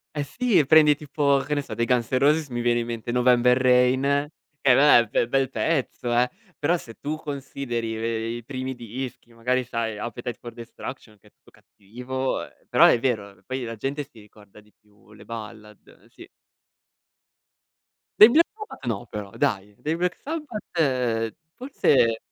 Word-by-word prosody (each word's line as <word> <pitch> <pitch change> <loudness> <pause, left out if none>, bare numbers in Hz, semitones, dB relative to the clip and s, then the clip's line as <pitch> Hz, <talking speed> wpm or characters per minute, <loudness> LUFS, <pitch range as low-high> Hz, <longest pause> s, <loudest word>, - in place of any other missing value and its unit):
Eh 145 - -1
sì, 210 - +1
prendi 150 0 +6
tipo, 140 -1 +1
che 150 - -2
ne 145 - 0
so, - - -8
dei 115 - 0
Guns 120 -2 +1
N' 130 - +2
Roses 150 +3 +3
mi 120 -1 -3
viene 120 0 +2
in 120 - -3
mente 115 0 -4
November 125 0 +4
Rain, 130 +3 +3 0.3
che 135 - +5
vabbè, 125 -3 +6
bel 115 - +1
bel 135 +1 +1
pezzo 135 -5 -1
eh; 120 +1 +3 0.3
però 150 +4 +1
se 115 -8 -12
tu 150 +2 -3
consideri 135 -6 -4
ve 115 0 -2
i 120 +1 -5
primi 130 +1 -5
dischi, 120 0 -8
magari 125 +3 0
sai, 115 -2 -3
Appetite 120 +2 -5
for 120 - -9
Destruction 115 -1 -9
che - - -23
è - - -19
tutto - - -25
cattivo, 125 +6 -5
uhm, - - -8 0.2
però - - +5
è 120 - +5
vero, 105 -6 -2
poi 130 0 -4
la 115 -1 -5
gente 140 +6 -3
si 135 -5 -18
ricorda 105 -1 -18
di 105 0 -23
più 105 -1 -24
le 105 - -14
ballad, 110 -2 -9 0.2
eh - - -23
sì. - - -14 1.9
Dei 215 - +11
Black 330 +6 +5
Sabbath, 425 - -10
no 115 0 -2
però 105 -3 -7
dai. 100 0 -1
Dei 155 +2 -2
Black 180 +1 -1
Sabbath, 150 - -2 0.2
forse 135 - +2
125 Hz, 175 wpm, -24 LUFS, 115-140 Hz, 1.9 s, Dei